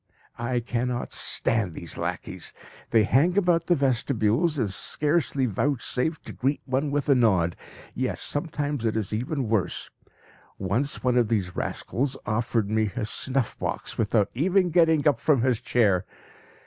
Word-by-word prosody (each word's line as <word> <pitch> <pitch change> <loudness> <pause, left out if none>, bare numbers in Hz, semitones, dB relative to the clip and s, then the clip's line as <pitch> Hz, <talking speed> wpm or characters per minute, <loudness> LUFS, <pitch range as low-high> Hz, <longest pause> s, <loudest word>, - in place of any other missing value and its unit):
I 120 +1 -1
cannot 120 +1 -3
stand 105 -8 +1
these 85 - -6
lackeys! - - -5 0.3
They 115 -2 +4
hang 155 - +2
about 175 -4 +2
the 175 - +4
vestibules, 135 +2 +1
and 110 -7 0
scarcely 145 - +2
vouchsafe 135 - -1
to - - -9
greet 135 +3 -1
one 135 +3 -1
with 145 -1 -1
a 140 - +6
nod. 95 -9 +2 0.4
Yes, - - -2
sometimes 145 -3 -2
it 110 -1 0
is 105 -2 -2
even 125 +3 -2
worse; 110 -3 -1 0.7
once 115 +9 -1
one 125 -1 +2
of 120 -2 +3
these 100 -5 -1
rascals 135 +2 -2
offered 115 -1 0
me 110 +1 +1
his 105 +1 -3
snuff 130 -3 0
box - - -4
without 105 -2 +1
even 180 +6 +2
getting 160 -3 +3
up 140 -6 +3
from 135 -4 +2
his 125 -4 +1
chair. 100 -6 +2
125 Hz, 150 wpm, -25 LUFS, 110-145 Hz, 0.7 s, a